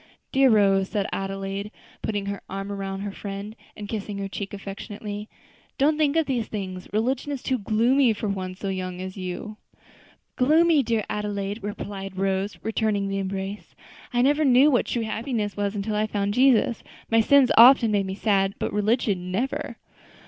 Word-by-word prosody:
"Dear 270 0 +5
Rose," 195 -3 +4
said 205 -3 -1
Adelaide, 195 +1 -4 0.3
putting 205 -2 -2
her 200 0 -4
arm 195 +1 -5
around 195 -1 -4
her 205 0 -4
friend 200 +2 -7 0.2
and 210 - -6
kissing 205 -1 -4
her 200 0 -3
cheek 195 0 -6
affectionately, 205 +1 -7 0.5
"don't 295 +3 +3
think 300 -1 +1
of 325 -1 +3
these 245 -5 -1
things; 185 -3 -5
religion 250 +6 -1
is 275 -3 -4
too 260 -2 0
gloomy 235 +5 +3
for 215 0 -4
one 185 -2 -3
so 195 +1 -4
young 185 -1 -4
as 185 0 -6
you." 190 +3 -6 0.8
"Gloomy, 315 +3 +4
dear 230 -3 0
Adelaide!" 205 0 -3
replied 195 -2 -6
Rose, 195 +1 -1
returning 215 -3 0
the 195 0 -1
embrace; 195 +1 -5 0.4
"I 245 0 +2
never 290 +3 +3
knew 270 +2 +6
what 245 - +2
true 235 - -1
happiness 220 -1 -2
was 205 0 -2
until 210 +1 -2
I 215 +1 +1
found 205 -1 -1
Jesus. 250 -2 +3 0.3
My 225 0 +5
sins 275 +2 +5
often 240 -1 +8
make 200 -2 +1
me 190 - -4
sad, 195 -2 +1
but - - -3
religion, 205 -4 0
never. 245 +9 -2
205 Hz, 170 wpm, -25 LUFS, 195-235 Hz, 0.8 s, often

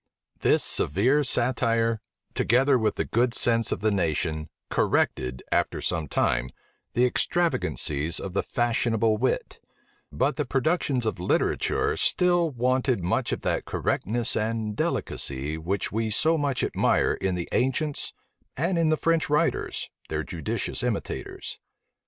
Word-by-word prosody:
This - - +3
severe 125 - +2
satire, 115 -3 +1 0.3
together 130 +3 +3
with 110 -1 +1
the - - -1
good 120 +1 +1
sense 115 -1 +2
of - - -2
the 110 0 +2
nation, 80 -4 -1 0.2
corrected, 65 0 0
after - - +1
some 80 -3 -2
time, 65 -1 +1 0.4
the 125 - +3
extravagancies 85 - 0
of 95 - -6
the - - +1
fashionable 115 -2 +1
wit; 130 +4 -1 0.5
but 145 - 0
the 150 - 0
productions 135 -2 0
of 110 - -2
literature 90 - +1
still 175 -2 +2
wanted 130 -3 +1
much 90 - 0
of - - -2
that - - -1
correctness 115 +3 -1
and 110 -1 -1
delicacy 70 -3 0
which 90 +5 -2
we 110 +1 -1
so 160 +10 +2
much 145 -4 -1
admire - - +2
in 95 -1 -1
the 85 -1 -3
ancients, 140 +3 0 0.5
and 170 +5 +1
in 165 -1 +3
the 155 - +2
French 165 -1 +1
writers, 150 +1 0 0.2
their - - -2
judicious - - -3
imitators. - - -4
115 Hz, 135 wpm, -26 LUFS, 95-135 Hz, 0.5 s, This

